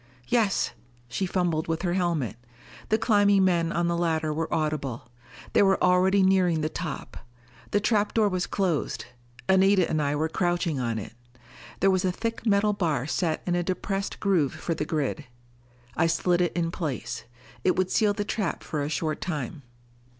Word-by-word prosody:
"Yes." 220 -5 +2 0.4
She 190 +10 -2
fumbled 175 -4 0
with 165 +1 -2
her 175 -2 0
helmet. 170 - 0 0.5
The 220 - +3
climbing 205 -3 +4
men 170 -2 +2
on 170 0 0
the 170 - +1
ladder 160 -2 0
were 160 +1 -3
audible. 150 -7 -2 0.4
They - - +5
were 195 -1 +4
already 185 +2 +4
nearing 185 -4 +3
the 155 - 0
top. 155 -3 -6 0.5
The 205 - +2
trap 210 -1 +1
door 220 -2 +4
was 185 -2 -1
closed; 180 -7 -1 0.4
Anita 190 -1 +4
and 155 -1 0
I 145 0 0
were 155 +2 0
crouching 175 -3 0
on 115 -3 -1
it. 110 - -6 0.7
There 195 +1 +5
was 185 -1 +1
a 185 - +2
thick 230 +4 -4
metal 210 0 +3
bar 155 -10 0
set 160 +1 -1
in 180 - 0
a 175 - +1
depressed 195 +2 -3
groove 180 -9 +2
for 170 - -3
the 160 - -3
grid. 150 -1 -2 0.7
I 160 - +3
slid 175 +2 +1
it 175 - +1
in 165 -1 -1
place; 125 -9 -4 0.4
it 185 - +3
would 185 0 0
seal 210 -2 +3
the 205 0 -3
trap 210 -4 -2
for 150 -2 -3
a 145 - -2
short 155 0 -2
time. 150 -4 -4
175 Hz, 180 wpm, -26 LUFS, 155-195 Hz, 0.7 s, They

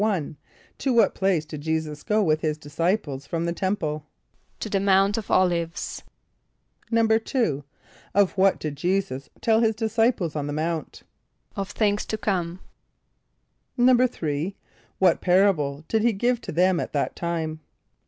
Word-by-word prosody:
=1.= 190 -9 0 0.4
To 265 - +1
what 235 - +4
place 190 -5 +1
did 150 -1 -8
J[=e]´[s+]us 160 -1 -2
go 215 0 +1
with 155 -3 +2
his 155 -2 -1
disciples 145 -1 -2
from 165 0 -2
the 170 - -1
temple? 160 -6 -2 0.5
=To - - -4
the 200 -2 0
Mount 195 +1 +3
of 225 - -4
[)O]l´[)i]ve[s+].= 170 -2 0 0.9
=2.= 225 - +1 0.5
Of 200 -2 +4
what 195 0 +4
did 150 -2 -4
J[=e]´[s+]us 180 -5 -1
tell 225 -1 +3
his 225 -1 +2
disciples 225 - +1
on 145 -1 -2
the 145 - -3
Mount? 160 +1 -3 0.5
=Of 195 -2 -3
things 205 -1 0
to 220 - -2
come.= 180 -4 -2 1.2
=3.= 220 - +2 0.4
What 185 -3 +3
parable 175 -6 +2
did 220 - +1
he 235 +1 +3
give 240 +4 0
to - - -6
them 180 +2 +3
at - - -4
that 145 - -1
time? 160 -2 -3
185 Hz, 145 wpm, -25 LUFS, 155-210 Hz, 1.2 s, what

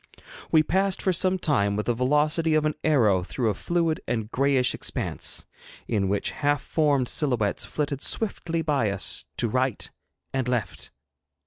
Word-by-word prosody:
We 155 -1 +5
passed 190 +4 +1
for 190 - +1
some 185 +1 +2
time 100 - +1
with 105 - -2
the 120 - +1
velocity 150 +6 +2
of 155 0 +2
an 155 - +1
arrow 115 -12 +3
through 110 +5 -1
a - - -2
fluid 165 - -1
and 110 -2 -2
grayish 135 -2 +2
expanse, - - -2 0.4
in 100 -4 0
which 100 +1 0
half 145 -1 0
formed 145 -5 +1
silhouettes 120 -10 0
flitted 145 -2 -3
swiftly 170 -6 0
by 140 -8 +1
us, 100 -1 -1
to - - +1
right 130 +1 -1 0.5
and 130 -2 -1
left. 120 -7 -3
140 Hz, 155 wpm, -25 LUFS, 115-155 Hz, 0.5 s, We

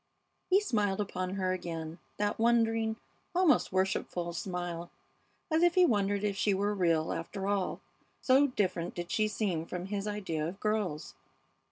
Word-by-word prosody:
He 385 +1 +6
smiled 210 - 0
upon 185 -2 -2
her 185 -1 0
again, 165 -2 -5 0.2
that 205 +1 -1
wondering, 225 -1 +2 0.4
almost 360 -4 +4
worshipful 185 -2 -1
smile, 175 -1 -4 0.6
as 315 +1 +3
if 345 0 +4
he 365 -1 +7
wondered 205 - +1
if 205 -1 0
she 200 0 +2
were 205 +2 0
real, 165 -5 +1
after 190 +4 -4
all, 200 -2 -1 0.4
so 270 +2 +5
different 185 -8 -1
did 175 0 -5
she 215 -1 +2
seem 200 -6 -1
from 180 +1 -5
his 200 +1 -3
idea 180 -7 -2
of 190 +4 -7
girls. 210 -8 -1
195 Hz, 155 wpm, -31 LUFS, 175-215 Hz, 0.6 s, he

